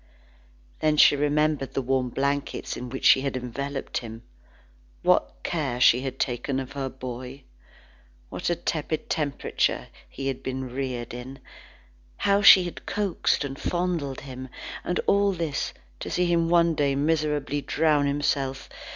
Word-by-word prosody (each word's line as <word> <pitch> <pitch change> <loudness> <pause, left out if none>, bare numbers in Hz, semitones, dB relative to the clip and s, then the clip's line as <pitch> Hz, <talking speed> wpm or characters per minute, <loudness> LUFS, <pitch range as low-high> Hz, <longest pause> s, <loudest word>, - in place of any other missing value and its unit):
Then 155 -1 +2
she 145 - +7
remembered 150 -1 0
the - - +1
warm 130 0 0
blankets 140 +3 -2
in 125 0 -6
which 135 +2 -5
she 130 - +7
had 135 -1 -2
enveloped 135 +3 -4
him. 115 0 -9 0.8
What - - +2
care 140 -8 -2
she 125 0 +6
had 135 -1 -4
taken 130 +2 -1
of 130 0 -6
her 140 -2 -3
boy! 130 +1 -8 0.9
What - - -3
a 175 - +2
tepid 155 -1 -3
temperature 145 -3 -1 0.2
he 135 - -7
had 135 -1 -2
been 130 0 -4
reared 125 -2 -4
in! 125 +2 -8 0.8
How 200 0 +2
she 190 -2 +9
had 175 - -7
coaxed 200 -7 0
and 135 -1 -6
fondled 175 -6 -2
him! 130 -1 -8 0.3
And 180 - -1
all 200 0 +3
this 165 -5 -2 0.3
to - - -5
see 180 - +1
him 170 -1 +2
one 170 -1 +4
day 145 -3 +1
miserably 150 -1 0
drown 150 -1 +2
himself! 140 -2 -1
140 Hz, 150 wpm, -26 LUFS, 130-155 Hz, 0.9 s, she